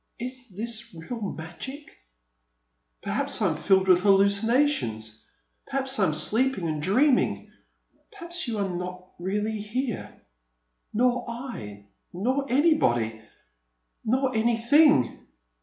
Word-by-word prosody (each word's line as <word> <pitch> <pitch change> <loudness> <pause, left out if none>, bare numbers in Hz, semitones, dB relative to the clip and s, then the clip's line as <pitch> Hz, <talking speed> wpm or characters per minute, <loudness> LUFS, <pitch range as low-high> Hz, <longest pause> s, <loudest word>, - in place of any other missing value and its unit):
Is 250 +1 -7
this 225 +1 -5
real 225 +9 -7
magic? 205 - -7 1.1
Perhaps - - -1
I - - +2
'm - - -2
filled 190 -1 +2
with 180 -1 +6
hallucinations. 200 - +2 0.4
Perhaps 265 -1 -1
I 195 - +4
'm - - +2
asleep 220 - +1
and 155 -4 -2
dreaming. 250 - +2 0.6
Perhaps 345 - -5
you 225 -2 -2
are 200 -1 0
not 180 0 -6
really 210 +4 -2
here 235 +2 -4 0.4
— - - -50
nor 245 +2 +2
I 170 - -7 0.2
— - - -21
^nor 260 +9 -1
anybody, 120 - +2 0.8
nor 255 +3 +1
any 230 +1 +2
thing!' 235 - +4
220 Hz, 120 wpm, -26 LUFS, 180-255 Hz, 1.1 s, with